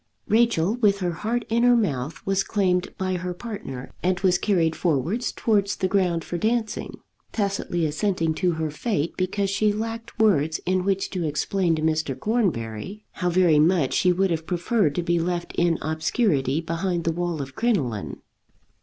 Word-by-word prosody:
Rachel, 220 -5 +3
with 205 -4 +3
her 175 -1 0
heart 220 +9 -2
in 230 +1 +1
her 245 0 +5
mouth, 145 - -2
was 195 0 +1
claimed 185 -4 +1
by 185 -1 -1
her 180 0 -4
partner, 175 - -7
and 180 0 +1
was 185 -2 +3
carried 170 -6 +1
forward 170 - 0
towards 205 -3 +1
the 185 - 0
ground 180 -4 +1
for 175 - -4
dancing, 220 +1 -1 0.3
tacitly 195 -5 -1
assenting 165 +1 0
to 180 +1 0
her 160 -1 -2
fate 165 -2 -1
because 195 +2 -1
she 210 +1 +2
lacked 225 +2 -5
words 160 -8 +3
in 185 0 +1
which 195 -1 0
to 180 -3 -2
explain 170 +3 0
to 155 - -3
Mr. 155 -4 0
Cornbury 195 - -2
how 180 - -1
very 175 -4 +4
much 160 -3 +3
she 180 - +3
would 190 +1 +1
have 160 0 -2
preferred 175 -2 +1
to 175 - -1
be 170 0 +1
left 175 0 -2
in 170 -2 +2
obscurity 155 - +1
behind 170 +1 -2
the 165 - +1
wall 175 -1 -2
of 135 -1 -6
crinoline. 125 - -1
180 Hz, 170 wpm, -24 LUFS, 160-200 Hz, 0.3 s, her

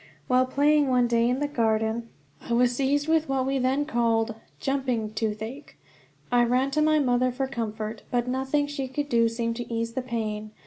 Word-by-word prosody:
While 255 0 +3
playing 290 +2 +3
one 250 -1 +3
day 235 0 +2
in 250 - +1
the 290 - +1
garden, 225 -3 0 0.4
I - - +1
was 245 +1 +3
seized 285 +3 +1
with 320 -2 +2
what 265 -1 +1
we 270 0 0
then 265 +3 +1
called 230 -2 +1 0.3
"jumping" 255 -6 -1
toothache. 220 +5 -4 0.5
I 245 0 +4
ran 255 +3 +1
to 305 - +1
my 310 0 +4
mother 255 -3 +2
for 265 +2 -2
comfort, 220 -4 -4
but 245 0 0
nothing 265 +3 0
she 285 -2 -4
could 290 +3 -3
do 230 -3 +3
seemed 230 0 -2
to 240 -1 -6
ease 230 0 -2
the 260 - -2
pain. 215 -3 -4
250 Hz, 190 wpm, -26 LUFS, 230-270 Hz, 0.5 s, I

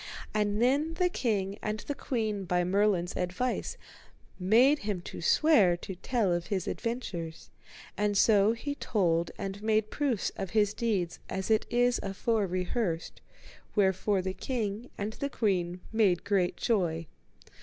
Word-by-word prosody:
And 210 -1 +1
then 285 +7 +2
the 360 +1 +2
king 205 - -1
and 215 0 -3
the 285 - -4
queen 220 -7 -2
by 180 0 +1
Merlin's 190 -1 +1
advice 180 +8 -2 0.6
made 240 +10 +5
him 205 -3 -2
to - - -8
swear 200 - +4
to 190 +2 -7
tell 200 0 0
of 175 0 -2
his 190 -4 -2
adventures, 175 -9 -4 0.4
and 205 0 +1
so 210 +1 +5
he 285 +5 -4
told 170 -11 0
and 195 +1 -5
made 215 0 +1
proofs 270 -8 0
of 195 - -4
his 205 -1 +3
deeds 200 -8 -1
as 190 +3 -2
it 220 - +3
is 245 0 +2
afore 200 +1 0
rehearsed, 180 -1 -2 0.5
wherefore 190 -1 +2
the 190 0 -2
king 225 0 -3
and 210 +2 -3
the 280 - -3
queen 180 -7 -1
made 200 -6 +3
great 190 -3 +1
joy. 170 -8 0
205 Hz, 145 wpm, -29 LUFS, 185-230 Hz, 0.6 s, made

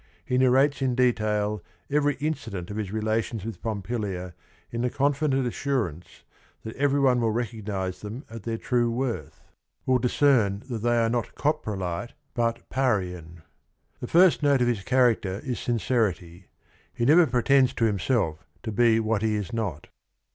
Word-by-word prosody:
He 125 - +1
narrates 135 +2 +3
in 130 -2 +1
detail 105 -4 +1 0.3
every 145 0 +1
incident 115 - -4
of 105 - -5
his 105 -3 -3
relations 110 0 -1
with 115 - -6
Pompilia 100 -4 -3 0.4
in 115 - -3
the 125 - +1
confident 140 0 +1
assurance 120 - -3 0.4
that 110 - -7
every 140 0 +2
one 130 -3 +3
will 115 - +2
recognize 105 -5 -3
them 110 +6 -7
at 115 0 -9
their 115 +2 -3
true 120 0 +1
worth, 120 +1 -3 0.4
will 130 -1 +3
discern 120 -5 +2
that 115 - -2
they 120 +1 +2
are 115 -1 +3
not 120 0 -2
"coprolite" 110 - -2 0.2
but 115 -1 -1
"Parian." 90 -10 -2 0.6
The 125 - -5
first 175 +3 +5
note 140 -2 +3
of - - +1
his 120 -4 +1
c 95 - -14
haracter 115 -7 +2
is 125 -3 -3
sincerity. 100 -7 -1 0.4
He 120 - -2
never" 160 +5 +6
pretends 130 +1 +3
to 115 - +2
himself 100 -5 0 0.2
to 110 - -3
be 115 +1 +4
what 110 -2 0
he 110 -1 +1
is 105 +2 -4
not. 105 -10 -3
115 Hz, 160 wpm, -26 LUFS, 105-130 Hz, 0.6 s, never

